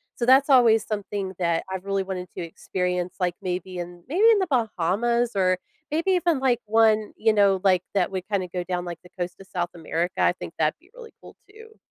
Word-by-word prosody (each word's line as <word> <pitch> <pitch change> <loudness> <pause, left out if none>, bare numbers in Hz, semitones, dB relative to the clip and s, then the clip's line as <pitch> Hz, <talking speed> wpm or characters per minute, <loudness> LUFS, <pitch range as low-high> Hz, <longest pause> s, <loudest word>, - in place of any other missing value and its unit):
so 240 - -2
that's 265 +3 +5
always 235 -5 +5
something 205 -2 -4
that 170 -2 +1
I've 190 -1 -4
really 195 -1 0
wanted 185 -1 -5
to - - -3
experience, 180 +1 -3
like, 180 -2 0
maybe 185 0 -4
in 175 0 -8
maybe 390 - +4
in 420 - +4
The 375 - 0
Bahamas 235 - +1
or 185 -1 +2 0.3
maybe 330 +5 +1
even, 350 -5 +2
like, 260 -3 +2
one, 220 -1 +3
you 220 0 +3
know, 200 -2 +4
like, 185 -3 +4
that 195 -3 +1
we 190 -1 -2
kinda 190 -1 -2
go 180 - -1
down, 180 0 -3
like, 175 -1 -6
the 180 - -16
coast 175 0 -3
of 195 - -13
South 175 -2 -2
America, 170 +2 -3
I - - +4
think 175 - -9
that'd 155 0 +1
be 355 - -25
really 470 -2 -11
cool - - -14
too. 445 +1 -15
195 Hz, 215 wpm, -24 LUFS, 180-240 Hz, 0.3 s, that's